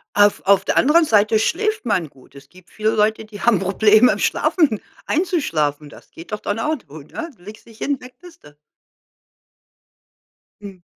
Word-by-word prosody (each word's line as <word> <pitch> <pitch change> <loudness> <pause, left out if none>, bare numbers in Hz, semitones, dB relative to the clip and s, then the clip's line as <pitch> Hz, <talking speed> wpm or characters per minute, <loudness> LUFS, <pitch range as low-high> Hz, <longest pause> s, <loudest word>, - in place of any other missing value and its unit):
Auf 205 0 +3
auf 200 0 +4
der - - -1
anderen 320 +4 +4
Seite 215 -3 +3
schläft 430 - -1
man 185 -8 0
gut. 135 -1 -22
Es 140 0 -14
gibt 185 +1 -20
viele 215 0 -1
Leute, 220 +1 0
die 215 -1 -11
haben 235 -3 +3
Probleme, 215 +4 +4
im - - -3
Schlafen 290 - +1 0.3
einzuschlafen. 160 - -1
Das - - -17
geht 165 - -13
doch 210 - -3
dann 205 +2 -3
auch 305 +6 -1
gut, 145 0 -13
ne? 335 0 -6
Legst 210 +5 -13
dich 225 -1 -18
hin, 280 -2 -2
weg 250 0 -13
bist 355 -2 -16
du. 145 0 -17 2.1
Mhm. 195 -3 -11
215 Hz, 175 wpm, -20 LUFS, 185-270 Hz, 2.1 s, auf